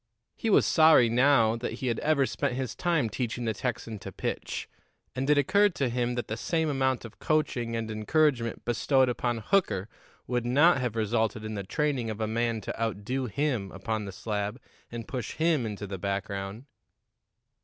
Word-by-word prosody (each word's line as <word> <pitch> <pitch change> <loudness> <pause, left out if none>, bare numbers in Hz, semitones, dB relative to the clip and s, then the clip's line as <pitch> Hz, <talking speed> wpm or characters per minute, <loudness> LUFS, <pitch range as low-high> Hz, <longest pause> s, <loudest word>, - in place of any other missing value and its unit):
He 225 - -2
was 205 - +5
sorry 155 -7 +6
now 120 -2 +4
that 115 - -4
he - - -5
had 120 -3 0
ever 150 -3 +2
spent 125 - -2
his 130 -3 -3
time 170 -8 +1
teaching 120 +1 -3
the 110 - 0
Texan 115 -2 -4
to - - -8
pitch, - - -4 0.5
and 135 +2 -2
it 150 - +5
occurred 195 +6 +3
to 135 -3 0
him 120 0 -1
that 120 - -3
the 110 - -3
same 160 +5 0
amount 130 -3 0
of 115 - -12
coaching 125 -7 0
and 110 -1 -3
encouragement 115 +2 +1
bestowed 130 +3 +2
upon 120 -1 -1
Hooker 115 - +1 0.4
would 125 -1 -1
not 140 +5 +4
have 120 -3 -2
resulted 110 0 0
in 110 - -4
the 100 - -3
training 130 - -1
of 110 -1 -5
a 110 - 0
man 115 0 -1
to 105 - -6
outdo 115 +4 -2
him 120 -4 -1
upon 105 +2 -3
the 100 - -6
slab 105 +4 -3 0.3
and 120 -1 -6
push 125 -3 -4
him 160 -7 +2
into 105 -1 -5
the 95 -1 -6
background. 100 +3 -4
120 Hz, 185 wpm, -28 LUFS, 110-135 Hz, 0.5 s, sorry